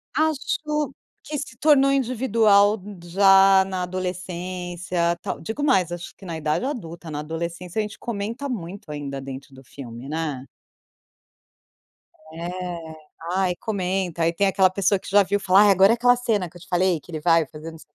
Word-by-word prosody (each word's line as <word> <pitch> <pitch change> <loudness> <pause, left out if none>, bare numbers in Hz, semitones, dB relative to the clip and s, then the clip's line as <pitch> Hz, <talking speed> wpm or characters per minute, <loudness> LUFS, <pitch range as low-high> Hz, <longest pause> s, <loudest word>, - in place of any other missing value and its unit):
Acho 300 -2 -1 0.3
que 300 - -4
se 270 -4 -6
tornou 275 -2 +5
individual 225 -6 +3 0.2
já 195 +1 +6
na 185 -1 -3
adolescência, 180 -1 -3
tal - - -4
Digo 220 - -5
mais, 185 - +3
acho 175 0 -7
que 195 - -13
na 165 -3 -5
idade 155 +9 -1
adulta. 170 - -6
Na 145 - -4
adolescência, 170 +5 -5
a - - +4
gente 210 0 -6
comenta 230 +5 -4
muito 190 -6 -6
ainda 140 -2 -5
dentro 135 0 -9
do 130 0 -14
filme, 125 -1 -10
né. 150 -4 -3 1.9
É. 170 -1 -6 0.4
Aí, 185 -1 +1
comenta. 185 -4 -2
Aí 165 - +3
tem 195 +4 +1
aquela 190 -1 +4
pessoa 195 +1 +1
que - - -10
já 205 +1 +5
viu 200 +2 0
falar: 195 +2 +5
"Agora 195 +2 +6
é - - +2
aquela 245 +1 +4
cena 220 -7 -1
que 175 - -15
eu - - -17
te 185 - -14
falei 180 -1 +1
que 175 - -15
ele 155 - -4
vai 165 0 +3
fazer 155 +3 -9
não 160 - -12
sei 160 - -18
185 Hz, 175 wpm, -23 LUFS, 165-210 Hz, 1.9 s, já